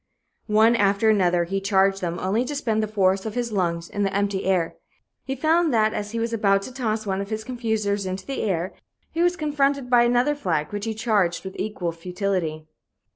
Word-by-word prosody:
One 220 +2 +5
after 205 0 +3
another 180 -4 +3
he 195 +3 -2
charged 195 -1 +2
them, 175 -1 -2
only 195 +7 0
to 290 - -4
spend 225 -6 0
the 215 - -1
force 195 -2 +2
of 220 0 -5
his 240 -2 -2
lunges 170 -4 -1
in 205 - -4
the 195 -1 +1
empty 200 -1 0
air. 185 -3 0 0.5
He 270 - -3
found 320 +3 +2
that 215 -1 +3
as 205 0 -3
he 230 - -5
was 230 0 -2
about 195 -3 +2
to 255 - -8
toss 220 -4 -2
one 195 -1 -1
of 200 - -6
his 220 0 -3
confusers 220 -5 -1
into 185 +1 -4
the 275 - -3
air, 185 -3 -1 0.4
he 330 - -1
was 350 +1 +3
confronted 280 -5 0
by 240 -1 +6
another 245 +4 +3
flag, 170 - -2
which 205 +1 -3
he 220 -1 -3
charged 205 -6 0
with 190 - -7
equal 190 -5 -2
futility. 175 -2 -3
205 Hz, 210 wpm, -24 LUFS, 190-235 Hz, 0.5 s, by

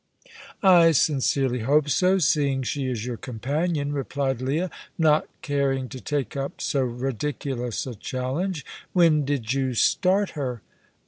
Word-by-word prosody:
"I 175 -4 +7
sincerely 135 -3 +2
hope 145 +6 +2
so, 185 +7 +3
seeing 145 -6 +2
she 135 +1 -2
is 115 -3 -3
your 125 -2 -4
companion," 145 +5 -2
replied 135 -2 -2
Leah, 155 +8 -1 0.3
not 155 -2 +3 0.2
caring 135 -2 0
to 130 -2 -8
take 145 -6 -2
up 140 0 -4
so 140 - 0
ridiculous 125 0 -3
a 130 - -5
challenge. 135 - -3 0.3
"When 160 -5 +4
did 130 -4 -1
you 130 -2 -1
start 190 - +2
her?" 125 -6 -4
140 Hz, 135 wpm, -25 LUFS, 130-150 Hz, 0.3 s, I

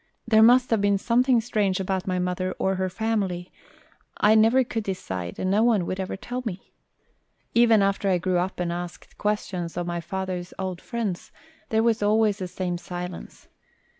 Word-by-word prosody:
There 220 -1 +5
must 245 +2 +6
have 225 -3 +3
been 200 0 +3
something 245 +4 +3
strange 210 -5 0
about 190 0 -2
my 185 -1 0
mother 180 +1 -1
or 190 - +1
her 185 0 -1
family; 190 -3 -2 0.7
I 210 - +5
never 225 +4 +5
could 225 -2 -3
decide 95 - -5
and 185 - -1
no 205 +2 +3
one 225 -6 +3
would 185 - -4
ever 190 0 -3
tell 245 +5 -5
me. 195 -5 -7 0.8
Even 230 -3 +5
after 195 0 +1
I 185 - +3
grew 180 0 0
up 185 +1 -3
and 175 -1 -1
asked 175 0 -8
questions 185 -5 -2
of 175 - -1
my 175 0 -3
father's 185 0 -5
old 185 -2 -4
friends 215 -7 -4 0.4
there 220 0 +2
was 230 -2 +2
always 210 0 +2
the 185 - -3
same 180 -1 -3
silence. 180 0 -8
190 Hz, 180 wpm, -25 LUFS, 180-220 Hz, 0.8 s, must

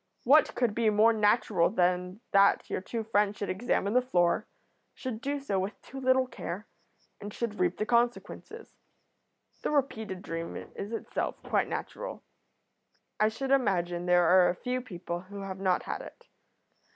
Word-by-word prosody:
What 295 +5 +5
could 240 -4 +1
be 230 0 +2
more 215 +2 +5
natural 210 -4 +3
than 180 +1 0
that 200 0 +4
your - - -1
two 225 +4 -4
friends 210 -1 +1
should 200 - -2
examine 200 0 0
the 250 - +5
floor, 175 -9 +1 0.5
should 245 -4 -5
do 285 +2 -2
so 205 -9 -1
with 190 +3 -4
too 270 - -9
little 260 0 +3
care, 210 -5 -6 0.5
and 205 0 -7
should 220 0 -4
reap 180 -1 +1
the 215 - -1
consequences? 240 +1 -1 0.9
The - - -1
repeated 220 -10 -1
dream 165 0 -5
is 200 +2 -7
itself 230 - -3
quite - - +1
natural; - - -5 1.0
I 215 - +5
should 265 +5 -4
imagine 180 -9 +1
there 175 0 +5
are 180 +2 +6
few 250 +6 -2
people 175 -7 -5
who 200 +2 -9
have 190 -1 -6
not 185 -2 +1
had - - -4
it. - - -12
210 Hz, 160 wpm, -29 LUFS, 185-245 Hz, 1.0 s, are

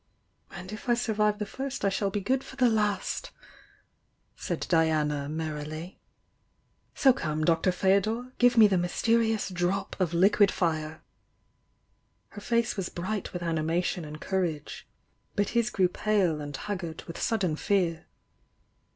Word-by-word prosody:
"And 185 +1 -9
if 215 +3 -7
I 240 - +5
survive 210 -3 +1
the 210 - -3
first 265 +1 -4
I - - +4
shall 195 +1 0
be 205 +1 -2
good 260 +6 0
for - - -11
the 255 -2 +4
last," 210 -2 -1 1.1
said - - -3
Diana, 150 -4 +1
merrily. 155 +2 -5 1.0
"So 265 -2 +5
come. 155 -9 -2
Doctor 165 +3 +3
Fdo 190 +2 +3
dor! 230 +5 -3
— - - -37
give 245 0 +4
me 220 - +9
the 190 -3 +2
mysterious 225 +4 +1
'drop' 185 +2 -1
of 180 -4 +1
liquid 200 +3 +5
fire!" 155 -3 -2 1.3
Her 205 - -10
face 235 +1 0
was 195 -3 -3
bright 190 +3 -4
with 175 -1 -5
animation 165 +2 -1
and 155 0 -8
courage 170 -6 -3 0.2
— - - -43
but 205 -1 +1
his 235 -1 +1
grew 190 -6 +2
pale 180 -5 +1
and 145 -2 -5
haggard 175 -4 -5
with 165 - -8
sudden 195 -9 0
fear. 175 -3 0
190 Hz, 150 wpm, -28 LUFS, 165-215 Hz, 1.3 s, me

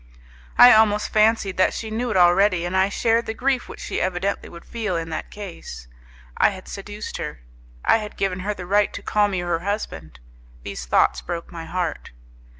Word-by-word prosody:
I 245 - +10
almost 215 -1 +3
fancied 215 -3 +3
that 185 - +3
she 220 -1 -5
knew 240 +3 -2
it 215 - 0
already, 180 0 +4
and 175 +2 -3
I 190 +1 +3
shared 230 +3 +1
the 220 - -3
grief 260 0 0
which - - -9
she - - -3
evidently 185 +2 -2
would 170 0 -12
feel 215 -6 -3
in 165 -1 -3
that 155 - -4
case. 170 - -9 0.5
I - - +5
had 190 -2 -9
seduced 205 +1 -7
her. 75 -5 -6 0.4
I - - +5
had 210 -2 -7
given 190 -2 -1
her 205 +3 -2
the 180 - -7
right 205 +2 +2
to - - -7
call 210 -1 +2
me 190 -3 -2
her 175 -1 -1
husband. 80 - -5 0.4
These - - -6
thoughts - - +3
broke 170 -1 -6
my 165 -1 -7
heart. 175 -2 -3
195 Hz, 195 wpm, -23 LUFS, 175-215 Hz, 0.5 s, I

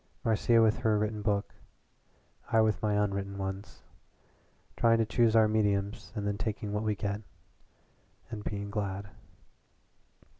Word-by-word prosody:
Marcia 115 +1 +3
with 110 -1 +3
her 110 -3 +2
written 105 0 -1
book; 100 -1 -1 1.0
I 115 - +4
with 110 0 +1
my 105 -2 +1
unwritten 100 -1 -1
ones. 95 +1 -6 0.9
Trying 115 0 +4
to 115 - +2
choose 115 0 +2
our 110 -1 +6
mediums 105 -1 0
and 105 -2 -3
then 100 0 -2
taking 105 -1 -3
what 105 - 0
we 105 -1 0
get 100 +1 -3 1.1
and 105 -2 -5
being 100 -1 -4
glad." 100 -1 -3
105 Hz, 140 wpm, -30 LUFS, 100-110 Hz, 1.1 s, our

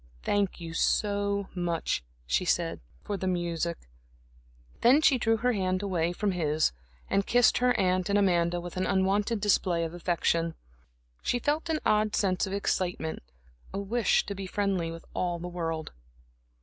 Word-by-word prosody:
"Thank 205 -2 0
you 165 -1 -7
so 200 +2 +1
much," 175 - -1 0.2
she - - +1
said - - 0 0.2
"for 205 - -3
the 190 - -3
music." 170 -2 -1 1.0
Then 255 +5 +6
she 275 -4 +4
drew 225 -1 +2
her 250 +3 +1
hand 185 -1 0
away 175 -4 0
from 200 +3 -1
his 155 -3 +1 0.4
and 195 - +1
kissed 245 -2 +4
her 250 0 +2
aunt 185 -1 +1
and 200 - +3
Amanda, 175 -3 +2
with 175 +1 -7
an 185 - 0
unwonted 200 +3 +1
display 185 -4 +2
of 165 0 -4
affection. 170 -1 0 0.7
She 245 - 0
felt 300 +6 -1
an 315 -1 0
odd 215 0 +2
sense 190 -1 +1
of 190 - -5
excitement, 180 -5 -1 0.5
a - - -1
wish 225 +4 +1
to 200 - -4
be 195 -1 -6
friendly 190 -4 -1
with 165 0 -8
all 175 -1 -1
the 175 +1 -6
world. 165 -3 -3
190 Hz, 160 wpm, -28 LUFS, 170-205 Hz, 1.0 s, Then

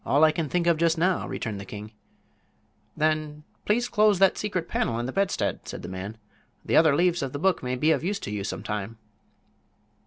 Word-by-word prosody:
"All 145 +3 +3
I 155 - +7
can 155 -2 -3
think 175 +2 0
of 170 -2 +3
just 165 0 +2
now," 180 +2 +1
returned 110 -4 -4
the - - -6
king. 105 +2 -9 1.1
"Then, 155 -1 0 0.2
please 240 +4 +1
close 210 -3 +3
that 195 0 +4
secret 185 -5 -3
panel 115 -7 -1
in 120 - -2
the 130 - -3
bedstead," 195 +3 -1
said - - -7
the - - -6
man; 95 +4 -6 0.5
"the - - +1
other 155 -3 +6
leaves 175 +1 +2
of 135 -2 -3
the - - -2
book 185 +4 +1
may 125 0 -2
be 150 +5 +2
of 160 - +1
use 200 +4 -1
to - - -5
you 105 -1 -3
some - - -4
time." 105 +1 -4
155 Hz, 215 wpm, -26 LUFS, 115-180 Hz, 1.1 s, I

